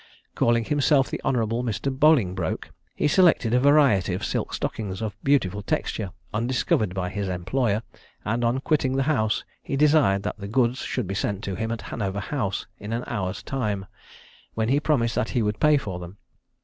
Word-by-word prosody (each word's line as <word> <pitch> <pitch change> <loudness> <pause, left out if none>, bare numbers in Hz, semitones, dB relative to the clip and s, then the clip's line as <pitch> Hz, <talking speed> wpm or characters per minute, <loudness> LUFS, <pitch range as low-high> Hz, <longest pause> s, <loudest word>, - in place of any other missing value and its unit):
Calling 115 0 +2
himself 145 -1 +2
the - - -3
Hon. 135 - +1 0.3
Mr. 125 +3 -2
Bolingbroke, 130 - +2 0.2
he - - +1
selected 155 -8 +4
a 125 - +5
variety 135 -10 +4
of - - -3
silk - - -2
stockings 95 -4 -3
of 110 -2 -4
beautiful 105 -8 +2
texture, 105 0 -2 0.2
undiscovered 110 -4 0
by 90 -1 -1
his 100 +1 -3
employer, 105 +5 0 0.4
and 115 +3 0
on 120 +3 +1
quitting 135 -4 +1
the 135 - +2
house, 110 -7 +1 0.2
he - - -3
desired 145 -9 +4
that - - -4
the 100 - -6
goods 120 +3 +1
should 125 - -2
be 95 - -4
sent 100 0 -2
to 100 - -3
him 110 +5 -3
at 115 - -4
Hanover 100 -2 -3
House 100 -2 -2
in 105 +3 -5
an 120 +2 -2
hour's 95 0 -3
time, 105 -7 -2 0.7
when 110 0 0
he 140 +3 +3
promised 125 -7 +1
that 115 - -1
he 115 - +3
would 105 0 -1
pay 150 -1 +5
for 95 -9 -4
them. 90 +3 -9
115 Hz, 185 wpm, -25 LUFS, 100-135 Hz, 0.7 s, a